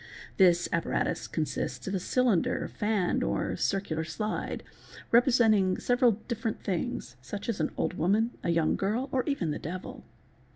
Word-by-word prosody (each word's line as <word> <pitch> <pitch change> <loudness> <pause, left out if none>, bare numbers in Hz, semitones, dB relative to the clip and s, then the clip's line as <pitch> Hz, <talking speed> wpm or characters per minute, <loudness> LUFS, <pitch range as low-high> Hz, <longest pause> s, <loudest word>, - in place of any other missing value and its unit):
This 175 -2 +5
apparatus 170 - 0
con 160 - -1
sists 125 -2 -4
of 190 - -2
a 190 - 0
cylinder, 235 -2 +1
fan, 210 -4 0
or - - -1
circular 180 -5 -1
slide, 210 +7 -3 0.5
representing 225 -6 +4
several 245 -1 +3
different 230 -2 -2
things, 130 -8 -3
such 200 +10 -6
as 230 -5 -1
an 155 - +1
old - - 0
woman, 210 +8 +2
a - - -1
young 165 -2 +2
girl, 225 +8 -1
or 260 - +2
even 200 - 0
the - - -3
devil. 180 +4 -6
195 Hz, 155 wpm, -29 LUFS, 170-230 Hz, 0.5 s, This